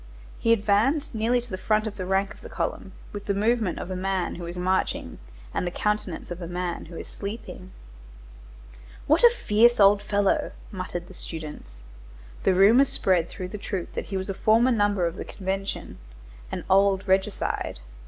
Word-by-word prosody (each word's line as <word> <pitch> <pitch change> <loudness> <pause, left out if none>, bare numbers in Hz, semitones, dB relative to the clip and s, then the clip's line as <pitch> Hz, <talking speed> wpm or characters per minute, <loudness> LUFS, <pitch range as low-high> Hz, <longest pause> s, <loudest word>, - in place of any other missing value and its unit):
He 230 - +2
advanced 230 +8 +2
nearly 230 +3 +2
to 240 - -12
the 185 - -4
front 215 +1 +1
rank 190 +1 0
of - - -18
the - - -10
column, - - -3 0.2
with 205 -1 -6
the 200 - +1
movement 215 -2 +1
of 190 - -5
a - - -2
man 190 0 -1
who 170 -1 -7
is 175 +1 -6
marching 185 +1 -1 0.3
and - - 0
the 175 - -1
countenance 210 -2 -2
of 175 +1 -5
a 170 - -5
man 175 0 -3
who 170 - -11
is - - -7
sleeping. 200 -2 -7 1.4
"What 310 +8 +3
a 475 - +10 0.2
fierce 235 +3 +5
old 200 0 +6
fellow!" 205 -1 +1 0.2
muttered 185 -3 -5
the 190 - -12
students. 150 - -8 0.6
The 190 - +4
rumor 220 +8 +7
spread 185 -10 +1
through 185 -2 -6
the 210 - -6
troop 195 -3 -4
that - - -3
he 195 - -3
was 190 - -4
a 195 - -2
former 225 +5 +4
member 205 -5 +2
of 170 +2 -3
the - - -4
Convention,—an - - -6
old 195 0 +3
regicide. 190 - 0
195 Hz, 175 wpm, -26 LUFS, 180-210 Hz, 1.4 s, a